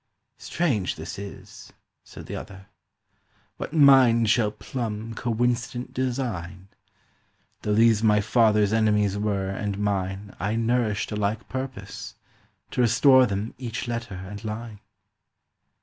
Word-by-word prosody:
—"Strange, 130 - -1
this 80 +4 -7
is!" 100 -1 -10 0.3
said - - -11
the - - -6
other; 95 -1 -9 0.9
"What - - -5
mind 130 -7 +6
shall 110 -3 +3
plumb 110 0 -5
"Coincident 120 +1 -1
design! 110 -8 -3 0.9
Though 105 -1 0
these 115 -1 +4
my 105 -2 +4
father's 105 -1 +3
enemies 105 -3 +2
were 100 -2 -1
and 100 0 -3
mine, 100 -1 -2
I 100 +4 -1
nourished 115 -2 0
a - - -2
like 105 +2 -2
purpose—to 130 -1 -7
restore 130 +2 +5
them 100 +2 -3
Each 120 -1 -4
letter 120 -3 -4
and 95 +4 -8
line." 110 -1 -6
110 Hz, 120 wpm, -25 LUFS, 100-120 Hz, 0.9 s, mind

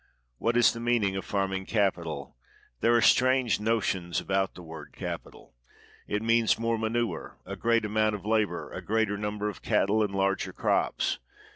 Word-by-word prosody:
What 115 +1 +1
is 120 - +5
the 115 - -7
meaning 115 -5 +1
of 95 - -3
farming 95 -1 -2
capital? 85 -9 -1 0.4
There 115 +2 +3
are 115 - +4
strange 130 -3 +4
notions 100 -5 0
about 95 0 -1
the 90 - -10
word 80 -2 -10
"capital." - - -7 0.5
It 105 +1 -2
means 115 0 +3
more 115 0 0
manure, 115 +1 -2
a - - -6
great 115 -1 +1
amount 110 0 +1
of 100 - -9
labor, 105 -5 0
a - - -6
greater 110 -1 0
number 105 0 -3
of 105 - -6
cattle, 105 +3 +2
and 100 -2 -1
larger 95 0 0
crops. - - 0
105 Hz, 165 wpm, -28 LUFS, 95-115 Hz, 0.5 s, is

